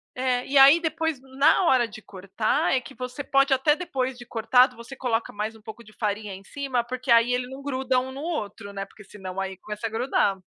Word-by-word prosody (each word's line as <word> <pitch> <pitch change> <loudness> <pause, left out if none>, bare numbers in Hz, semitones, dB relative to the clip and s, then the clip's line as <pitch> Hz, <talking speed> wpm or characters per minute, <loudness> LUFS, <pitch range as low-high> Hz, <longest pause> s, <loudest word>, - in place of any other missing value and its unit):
é, 250 -1 0
e 275 - 0
aí 280 +5 +8
depois, 320 -3 -2 0.2
na 290 +6 +5
hora 255 -8 +3
de 220 - -11
cortar 210 - -1
é 265 - +3
que 260 +2 -12
você 250 +3 -6
pode 275 +1 +2
até 270 +3 +3
depois 265 -7 -3
de 240 -1 -12
cortado, 250 +3 +3
você 235 +3 -10
coloca 235 -3 -2
mais 215 +2 -4
um 220 - -16
pouco 225 +1 -10
de 215 - -17
farinha 210 -2 -3
em 195 - -13
cima, 265 0 -2
porque 255 +1 -7
aí 235 +1 +5
ele 250 0 -1
não 265 +2 -10
gruda 260 -2 0
um 260 +1 -5
no 275 +2 -8
outro, 225 -11 -5
né. 195 0 -4
Porque 210 +1 -16
senão, 190 -1 -8
aí 190 0 -5
começa 210 +3 -5
a - - -6
grudar. 225 -4 +1
250 Hz, 230 wpm, -25 LUFS, 215-270 Hz, 0.2 s, aí